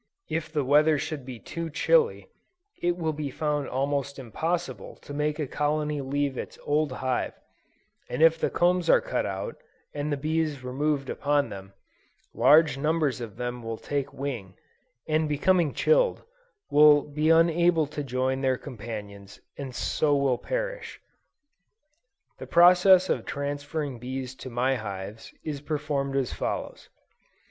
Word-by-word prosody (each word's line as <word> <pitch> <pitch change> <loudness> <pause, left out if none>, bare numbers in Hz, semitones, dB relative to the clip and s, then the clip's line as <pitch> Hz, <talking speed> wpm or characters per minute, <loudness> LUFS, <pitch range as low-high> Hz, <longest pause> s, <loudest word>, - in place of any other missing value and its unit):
If 160 -1 -2
the 150 -3 0
weather 150 +3 +4
should 140 -2 -5
be 125 -2 -6
too 165 +7 -6
chilly, 465 - +2 0.5
it 175 0 +1
will 160 -2 -1
be 150 -1 -4
found 150 +1 -2
almost 140 +1 -1
impossible 135 - -3
to 145 - -11
make 150 +1 -1
a 155 - -1
colony 150 +1 -1
leave 140 0 -1
its - - -7
old 150 -1 +1
hive, 130 0 -2 0.8
and 155 - 0
if 165 0 +5
the - - +1
combs 175 -1 +2
are - - +7
cut - - -2
out, - - -5 0.4
and 145 +1 -3
the 145 - 0
bees 155 -1 -1
removed 140 +2 -1
upon 145 -2 0
them, 95 -1 -9 0.6
large 150 -2 +5
numbers 150 -3 0
of 110 -4 -7
them 125 0 -4
will 115 -1 -5
take 140 +2 -3
wing, 120 -9 -5 0.5
and 155 0 +1
becoming 165 +2 +2
chilled, - - +2 0.5
will 150 0 +7
be 150 +2 -1
unable 165 0 +4
to 145 +1 -5
join 130 0 -1
their 130 -1 +1
companions, 105 -6 -8 0.2
and 135 -3 -7
so 145 -2 +1
will 140 -3 +1
perish. - - -4 1.4
The - - -8
process 180 +2 +6
of - - 0
transferring 145 -1 -4
bees 130 +1 -5
to 130 - -8
my 130 +2 +1
hives, 100 0 -7
is 145 -3 -4
performed 145 -2 -2
as 135 -3 0
follows. - - -4
145 Hz, 145 wpm, -27 LUFS, 130-155 Hz, 1.4 s, are